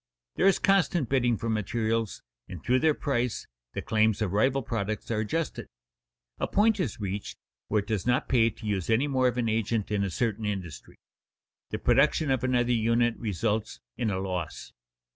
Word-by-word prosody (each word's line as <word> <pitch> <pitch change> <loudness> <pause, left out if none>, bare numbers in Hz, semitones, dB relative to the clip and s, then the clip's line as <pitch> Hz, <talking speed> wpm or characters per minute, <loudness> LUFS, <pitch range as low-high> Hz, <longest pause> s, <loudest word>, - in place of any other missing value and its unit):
There 190 - +3
is 195 - +5
constant 175 - +2
bidding 120 -4 +2
for 115 - -4
materials, 110 +1 -1 0.3
and 85 -4 -8
through 130 +1 +3
their 155 0 +3
price 125 -5 -1 0.3
the - - -4
claims 110 -1 +2
of 105 -4 -1
rival 130 +6 +2
products 110 -1 -3
are 110 - 0
adjusted. 150 +9 -2 0.7
A - - 0
point 210 +1 +3
is 145 - -2
reached 100 0 -4 0.3
where 105 -1 +1
it - - -23
does 110 -1 -2
not 125 +1 +2
pay 115 -3 +4
to 110 +1 -12
use 100 -4 -2
any 115 +6 +3
more 130 -2 +2
of 125 - -1
an 120 -2 0
agent 110 -1 -1
in 100 -1 +1
a 100 - -1
certain 110 +2 -1
industry; 90 -11 -5 0.7
the - - -3
production 140 +4 +3
of 130 -2 0
another 125 -1 +2
unit 115 +1 +2
results 110 +1 -2 0.2
in 120 -3 -1
a 95 - -1
loss. 90 -4 -4
115 Hz, 180 wpm, -28 LUFS, 105-130 Hz, 0.7 s, is